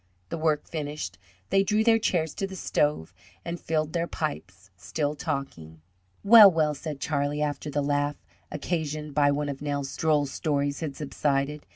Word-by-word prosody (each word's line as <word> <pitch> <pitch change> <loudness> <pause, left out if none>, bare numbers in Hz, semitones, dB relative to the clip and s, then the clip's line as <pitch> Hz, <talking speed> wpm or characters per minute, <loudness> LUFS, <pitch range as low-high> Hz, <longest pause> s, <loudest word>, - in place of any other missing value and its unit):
The 170 - -3
work 155 -2 +1
finished, 145 - -5 0.3
they 195 - +5
drew 210 +2 +2
their 225 0 +4
chairs 160 -7 0
to 195 - -3
the 190 - -9
stove, 145 - 0 0.3
and 170 0 -4
filled 155 -1 -1
their 170 0 0
pipes, 95 - -5
still 145 - -2
talking. 135 - -5 0.4
"Well, 210 -1 +10
well," 155 -4 +1
said 150 0 -6
Charlie, 145 0 -1
after 150 0 -3
the 145 0 -1
laugh 145 0 0 0.4
occasioned 150 -1 -3
by 145 -1 +4
one 145 +1 0
of 140 -1 -5
Nels' 145 -2 -3
droll 155 -3 +2
stories 140 0 -1
had 150 -4 -4
subsided. 145 0 -2
150 Hz, 165 wpm, -27 LUFS, 140-160 Hz, 0.4 s, Well